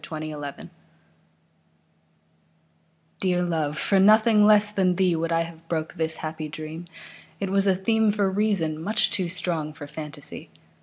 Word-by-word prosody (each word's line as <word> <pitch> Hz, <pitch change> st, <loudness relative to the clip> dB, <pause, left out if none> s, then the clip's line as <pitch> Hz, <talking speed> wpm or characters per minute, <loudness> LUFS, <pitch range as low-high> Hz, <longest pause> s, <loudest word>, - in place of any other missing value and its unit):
The -, -, -10 dB
Dream 150 Hz, -2 st, -7 dB, 2.5 s
DEAR 180 Hz, -2 st, +1 dB
love, 155 Hz, -4 st, -1 dB
for 195 Hz, +4 st, +2 dB
nothing 215 Hz, +1 st, +5 dB
less 210 Hz, -1 st, +5 dB
than 185 Hz, -3 st, +1 dB
theeWould 170 Hz, -3 st, +1 dB
I 165 Hz, 0 st, +2 dB
have 165 Hz, 0 st, -12 dB
broke 160 Hz, -2 st, -2 dB
this 160 Hz, 0 st, 0 dB
happy 155 Hz, 0 st, -5 dB
dream; 155 Hz, +3 st, -8 dB, 0.5 s
It 195 Hz, -1 st, -3 dB
was 195 Hz, 0 st, +2 dB
a 190 Hz, -, +4 dB
themeFor 205 Hz, -1 st, +1 dB
reason, 185 Hz, -7 st, 0 dB
much 215 Hz, +5 st, +1 dB
too 190 Hz, -6 st, -1 dB
strong 170 Hz, -4 st, -3 dB
for 150 Hz, -1 st, -9 dB
fantasy. 150 Hz, -1 st, -7 dB
175 Hz, 140 wpm, -25 LUFS, 155-200 Hz, 2.5 s, nothing